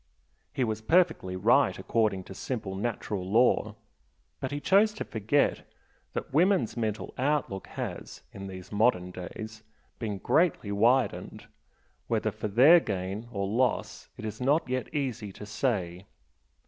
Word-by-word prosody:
He 130 Hz, -, -1 dB
was 110 Hz, -2 st, -2 dB
perfectly 160 Hz, -, +2 dB
right 115 Hz, +9 st, +3 dB
according 105 Hz, -5 st, 0 dB
to 95 Hz, -, -10 dB
simple 105 Hz, -2 st, -4 dB
natural 105 Hz, -2 st, -3 dB
law, 110 Hz, +7 st, +2 dB, 0.6 s
but 130 Hz, -, -3 dB
he 145 Hz, -, -2 dB
chose 205 Hz, +7 st, +4 dB
to 215 Hz, -, -4 dB
forget 110 Hz, +6 st, +1 dB, 0.5 s
that -, -, -5 dB
women's 170 Hz, -, +3 dB
mental 110 Hz, -2 st, -3 dB
outlook 135 Hz, -8 st, -1 dB
has, -, -, -6 dB
in 95 Hz, 0 st, -7 dB
these 95 Hz, -1 st, -9 dB
modern 100 Hz, -4 st, +2 dB
days, 110 Hz, +5 st, -8 dB, 0.4 s
been 105 Hz, -4 st, -3 dB
greatly 150 Hz, -, +1 dB
widened, 115 Hz, +3 st, +1 dB, 0.6 s
whether -, -, 0 dB
for -, -, -4 dB
their 135 Hz, -, +7 dB
gain 100 Hz, -, -4 dB
or 100 Hz, -3 st, -2 dB
loss 120 Hz, +4 st, -1 dB
it -, -, -7 dB
is 110 Hz, +3 st, -6 dB
not 145 Hz, +5 st, +2 dB
yet 130 Hz, 0 st, -3 dB
easy 125 Hz, -8 st, -3 dB
to 105 Hz, -, -9 dB
say. 100 Hz, -5 st, -2 dB
110 Hz, 140 wpm, -28 LUFS, 100-135 Hz, 0.6 s, their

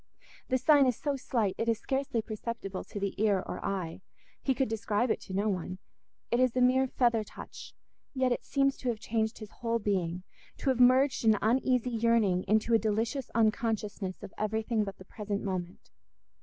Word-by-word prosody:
The 260 Hz, -, +3 dB
sign 280 Hz, +1 st, +5 dB
is 250 Hz, -, +1 dB
so 285 Hz, -2 st, -1 dB
slight, 230 Hz, -7 st, 0 dB
it 230 Hz, -, 0 dB
is 225 Hz, -, +2 dB
scarcely 265 Hz, -1 st, -1 dB
perceptible 215 Hz, -3 st, -5 dB
to 205 Hz, -, -6 dB
the 200 Hz, -1 st, -2 dB
ear 200 Hz, -3 st, +2 dB
or -, -, -6 dB
eye—he 195 Hz, +7 st, -4 dB
could 265 Hz, 0 st, +1 dB
describe 220 Hz, +1 st, 0 dB
it -, -, -1 dB
to 190 Hz, -, -9 dB
no 200 Hz, +2 st, +1 dB
one—it 185 Hz, +5 st, -5 dB
is 255 Hz, -2 st, +3 dB
a -, -, +2 dB
mere 260 Hz, +1 st, +4 dB
feather 240 Hz, -3 st, +2 dB
touch, -, -, -11 dB, 0.4 s
yet 260 Hz, -1 st, +2 dB
it 245 Hz, -, -1 dB
seems 275 Hz, -1 st, +1 dB
to 255 Hz, -, -2 dB
have 225 Hz, -3 st, -2 dB
changed 220 Hz, +1 st, -1 dB
his 215 Hz, -2 st, -9 dB
whole 230 Hz, -1 st, -1 dB
being, 185 Hz, -5 st, -1 dB, 0.3 s
to -, -, -1 dB
have 255 Hz, -, -2 dB
merged 255 Hz, +2 st, +5 dB
an 220 Hz, -2 st, +5 dB
uneasy 250 Hz, +2 st, +2 dB
yearning 225 Hz, -5 st, +2 dB
into 220 Hz, +3 st, +2 dB
a 225 Hz, -, +6 dB
delicious 225 Hz, +5 st, -1 dB
unconsciousness 215 Hz, -3 st, 0 dB
of 200 Hz, -, -9 dB
everything 220 Hz, +1 st, 0 dB
but 195 Hz, -2 st, -6 dB
the 185 Hz, -, -13 dB
present 205 Hz, 0 st, -4 dB
moment. 185 Hz, -2 st, -5 dB
225 Hz, 185 wpm, -30 LUFS, 205-250 Hz, 0.4 s, a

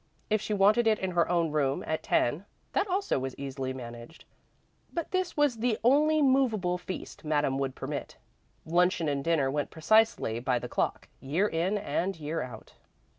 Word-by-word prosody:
If 215 Hz, -1 st, +2 dB
she -, -, -5 dB
wanted 210 Hz, +4 st, +4 dB
it 215 Hz, -1 st, +4 dB
in 190 Hz, -1 st, -3 dB
her 170 Hz, -1 st, +2 dB
own 170 Hz, -3 st, +1 dB
room, 140 Hz, -3 st, 0 dB
at 160 Hz, -, -2 dB
ten, 150 Hz, +11 st, +1 dB, 0.3 s
that -, -, +1 dB
also 385 Hz, -, 0 dB
was 130 Hz, 0 st, -4 dB
easily 135 Hz, -1 st, -4 dB
managed, 120 Hz, +3 st, -9 dB, 0.7 s
but 335 Hz, -2 st, -4 dB
this 370 Hz, -3 st, -1 dB
was 290 Hz, -5 st, +3 dB
the 225 Hz, -1 st, 0 dB
only 300 Hz, +5 st, +4 dB
"movable 225 Hz, -10 st, +2 dB
feast" 185 Hz, +1 st, -7 dB
Madame 145 Hz, -3 st, +1 dB
would 135 Hz, -1 st, -2 dB
permit. -, -, -5 dB, 0.5 s
Luncheon 175 Hz, 0 st, +2 dB
and 140 Hz, -1 st, -1 dB
dinner 150 Hz, -5 st, +2 dB
went 145 Hz, 0 st, -1 dB
precisely 190 Hz, -, +2 dB
by 125 Hz, 0 st, +1 dB
tae -, -, -5 dB
clock, -, -, -1 dB
year 160 Hz, +10 st, 0 dB
in 180 Hz, +4 st, 0 dB
and 195 Hz, -3 st, -2 dB
year 155 Hz, +2 st, -3 dB
out. 115 Hz, -3 st, -9 dB
170 Hz, 175 wpm, -29 LUFS, 140-220 Hz, 0.7 s, wanted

